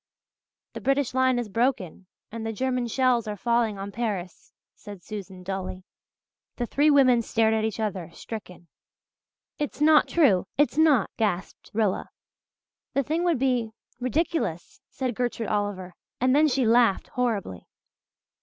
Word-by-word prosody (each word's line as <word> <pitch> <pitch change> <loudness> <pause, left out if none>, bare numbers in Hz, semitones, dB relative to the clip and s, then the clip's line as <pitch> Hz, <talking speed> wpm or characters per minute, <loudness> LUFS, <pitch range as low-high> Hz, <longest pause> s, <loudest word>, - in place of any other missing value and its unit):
"The - - -7
British 275 -1 +1
line 260 -1 +3
is 240 -2 -2
broken 210 -5 -1 0.2
and 230 0 -6
the 225 - -2
German 250 +1 -1
shells 245 -1 +1
are 210 -1 -4
falling 235 -2 +1
on 195 +1 -6
Paris," 200 -6 -4 0.2
said 205 -4 -11
Susan 195 -3 -8
dully. 185 0 -5 0.7
The 240 - -2
three 290 +5 +2
women 260 -5 +5
stared 220 0 +1
at 220 0 +1
each 220 0 -3
other, 190 -6 -3
stricken. 180 -3 -9 0.9
"It's 295 -1 -3
not 305 0 +5
true 215 - +3
it's 290 +1 +2
not," 300 -9 +4
gasped 190 -5 -2
Rilla. 210 -3 0 0.9
"The 275 - +2
thing 320 +5 -1
would 340 -4 +2
be 245 -4 0 0.3
ridiculous," 255 - -2
said 255 -2 -3
Gertrude 235 -1 -2
Oliver 205 -3 -2 0.3
and 255 +2 +3
then 305 +1 +5
she 270 -3 +1
laughed 230 -3 +3
horribly. 215 - -2
230 Hz, 145 wpm, -26 LUFS, 200-260 Hz, 0.9 s, women